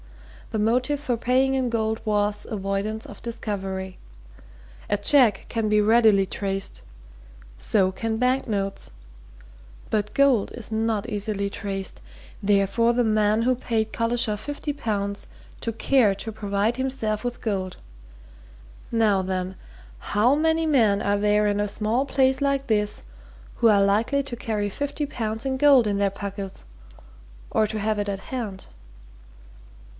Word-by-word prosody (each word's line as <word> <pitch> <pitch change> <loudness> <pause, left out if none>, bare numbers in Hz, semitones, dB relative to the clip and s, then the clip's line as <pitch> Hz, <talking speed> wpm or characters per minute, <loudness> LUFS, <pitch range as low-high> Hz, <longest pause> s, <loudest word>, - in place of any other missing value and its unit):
The 220 - -3
motive 250 +6 +1
for 260 -4 -1
paying 255 +3 +2
in 260 -2 0
gold 220 -1 -1
was 210 -1 0
avoidance 200 +1 -3
of - - -11
discovery. 195 -5 -4 0.9
A 205 - +2
cheque 215 -1 +4
can 225 -2 -1
be 210 0 +4
readily 215 -2 +5
traced. 195 0 -3 0.8
So 185 - +2
can 220 +3 -3
banknotes. 225 -6 -1 1.0
But 210 -1 -1
gold 275 -6 +3
is 235 -2 -8
not 220 0 0
easily 205 -2 -2
traced. 195 -2 -4 0.4
Therefore 205 +4 +3
the 245 0 +2
man 215 0 +2
who 255 +2 +3
paid 225 -3 -2
Collishaw 230 -2 +1
fifty 290 +5 -4
pounds 200 -6 -3 0.3
took 225 -1 -3
care 250 -7 +3
to 220 +3 -6
provide 205 +2 0
himself 260 -5 -1
with 245 0 -3
gold. 190 -4 -3 1.1
Now 215 -4 +3
then 185 0 -3 0.4
how 225 - +2
many 320 +1 +2
men 225 -10 +3
are 205 0 +1
there 210 0 +3
in 205 0 0
a 205 - 0
small 220 +6 0
place 265 0 +2
like 275 -1 0
this 210 -3 0 0.5
who 230 - +4
are 200 -2 +5
likely 225 +8 +2
to 270 -3 -6
carry 220 -4 -2
fifty 285 +6 -3
pounds 225 -3 -4
in 265 -1 0
gold 270 -5 +6
in 200 -1 0
their 200 -1 +3
pockets, 200 - -7 0.9
or 215 - +2
to 215 +1 -3
have 215 0 0
it 205 0 -1
at 195 -1 -3
hand?" 215 -7 -4
215 Hz, 140 wpm, -24 LUFS, 200-245 Hz, 1.1 s, gold